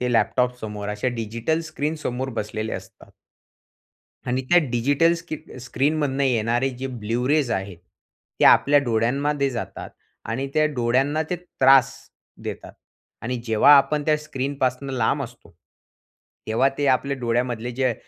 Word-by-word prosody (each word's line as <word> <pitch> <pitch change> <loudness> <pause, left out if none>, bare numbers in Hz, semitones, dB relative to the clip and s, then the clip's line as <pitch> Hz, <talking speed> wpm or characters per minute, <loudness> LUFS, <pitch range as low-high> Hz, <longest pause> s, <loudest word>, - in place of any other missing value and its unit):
ते 125 -1 -1
लॅपटॉपसमोर 115 -4 0
अशा 105 +4 -1
डिजिटल 115 +8 -2
स्क्रीनसमोर 140 -4 -3
बसलेले 110 +1 -4
असतात. - - -11 1.2
आणि 130 +1 -1
त्या 175 - +7
डिजिटल 145 +8 +2
स्की 165 -1 -6 0.2
स्क्रीनमधुन 140 +2 -1
येणारे 120 0 +1
जे 135 - -3 0.2
ब्लू 115 +4 -1
रेज 150 -4 +2
आहेत. 95 -5 -3 0.6
ते - - +5
आपल्या 145 +1 +6
डोळ्यांमध्ये 135 +5 0
जातात 120 -3 -6 0.4
आणि 130 +5 -2
त्या 155 0 +4
डोळ्यांना 130 +5 +1
ते 180 - 0
त्रास 135 -6 +4 0.5
देतात - - -7 0.5
आणि 125 +2 -2
जेव्हा 110 +6 +6
आपण 150 +2 +2
त्या 155 - +4
स्क्रीनपासून 135 -2 -3
लांब 130 +4 +1
असतो. 120 -7 -11 0.9
तेव्हा 115 +5 +2
ते 145 - +1
आपल्या 140 +1 -4
डोळ्यामधले 120 0 -1
जे 130 -1 0
130 Hz, 130 wpm, -23 LUFS, 115-145 Hz, 1.2 s, त्या